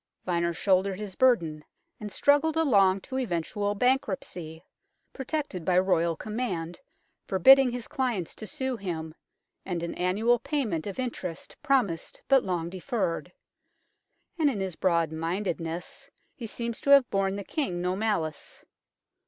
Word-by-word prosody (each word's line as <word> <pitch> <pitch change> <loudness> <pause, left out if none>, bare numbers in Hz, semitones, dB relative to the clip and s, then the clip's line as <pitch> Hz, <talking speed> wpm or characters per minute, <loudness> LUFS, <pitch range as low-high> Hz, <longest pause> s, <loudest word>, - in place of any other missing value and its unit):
Vyner 170 -1 +1
shouldered 190 0 +2
his 210 -3 -6
burden 170 -13 +2 0.4
and 210 -1 -6
struggled 290 +6 +3
along 200 -11 +4
to 260 +5 -4
eventual 205 -1 -2
bankruptcy, 190 -9 -1 0.5
protected 270 - -4
by 180 +2 +2
Royal 170 -3 +2
command 185 -6 -4 0.5
forbidding 265 +8 +7
his 240 -2 -5
clients 240 -10 -2
to 215 - -8
sue 260 +1 -3
him, 160 -6 -5 0.5
and 175 -3 -3
an 170 - -3
annual 215 +7 +2
payment 220 - -2
of 200 - -5
interest 210 -9 -5
promised 255 - 0
but 270 -2 +5
long 175 -3 -2
deferred; 185 0 -3 1.1
and 300 -2 +4
in 230 -7 -3
his 190 -3 -3
broad 170 -4 +1
mindedness 165 0 -3 0.2
he 235 - -7
seems 235 +1 -4
to - - -3
have 280 -3 +7
borne 195 0 +1
the 200 - -5
King 185 - -2
no 180 +1 -1
malice. 195 -8 -2
195 Hz, 135 wpm, -28 LUFS, 170-245 Hz, 1.1 s, forbidding